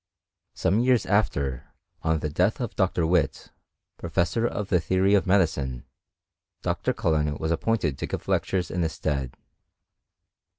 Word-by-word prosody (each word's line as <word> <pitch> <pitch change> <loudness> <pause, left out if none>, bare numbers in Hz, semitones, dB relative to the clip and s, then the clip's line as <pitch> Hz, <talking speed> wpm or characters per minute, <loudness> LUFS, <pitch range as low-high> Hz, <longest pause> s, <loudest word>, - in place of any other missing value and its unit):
Some 100 +5 +1
years 125 -1 +3
after, 70 - -1 0.3
on 80 -1 0
the 75 - -1
death 95 - +1
of 120 -4 -4
Dr. 95 -3 +1
Whytt, 85 -2 0 0.5
pro - - -6
fessor 115 +7 +1
of 105 -4 -4
the 90 - +3
theory 95 +4 +2
of 100 -1 +3
medicine. 75 -10 +1 0.8
Dr. - - 0
Cullen 75 -2 0
was 80 +1 -2
ap 85 - 0
pointed 90 - 0
to - - -3
give - - -5
lectures 90 -3 0
in 90 - -1
his 80 -1 -1
stead. 70 -5 -3
85 Hz, 155 wpm, -26 LUFS, 75-100 Hz, 0.8 s, years